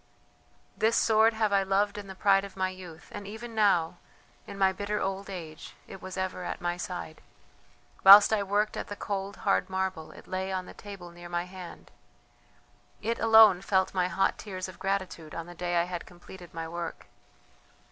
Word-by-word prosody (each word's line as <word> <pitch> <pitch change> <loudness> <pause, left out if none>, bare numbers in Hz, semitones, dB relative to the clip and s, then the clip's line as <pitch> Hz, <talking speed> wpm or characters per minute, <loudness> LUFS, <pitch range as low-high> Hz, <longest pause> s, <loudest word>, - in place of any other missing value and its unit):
"This 225 +1 +2
sword 220 0 +4
have 215 -2 +1
I 200 - +4
loved 195 +1 +1
in 205 -1 -7
the 190 - -9
pride 195 0 +3
of 200 -1 -10
my 185 0 0
youth, 180 -3 -11
and 205 -1 -7
even 225 +3 -8
now, 185 -6 +2 0.5
in - - -8
my 190 -1 +3
bitter 205 +2 -3
old 195 +1 -3
age, 165 -5 -8
it 190 - -11
was 185 0 -7
ever 185 -1 -3
at - - -4
my 175 0 -2
side. 175 -3 -6 0.8
Whilst 200 +3 +10
I 215 - +2
worked 205 +2 0
at - - -5
the 205 - -6
cold, 200 -1 -4
hard 195 - +2
marble, 190 -4 -3
it - - -14
lay 190 +1 -3
on 185 -1 -3
the - - -11
table 195 -4 -10
near 175 0 -11
my 175 0 -1
hand; 180 -1 -11 1.1
it 230 +2 -1
alone 220 -5 +7
felt 190 -2 +1
my 180 -2 +1
hot 190 +2 0
tears 185 -3 -6
of 185 - -12
gratitude 185 -5 -3
on 165 - -5
the 175 - -10
day 175 0 -3
I - - +3
had 175 -1 -6
completed 175 0 -13
my 165 0 -5
work. 170 0 -6
190 Hz, 190 wpm, -28 LUFS, 175-200 Hz, 1.1 s, Whilst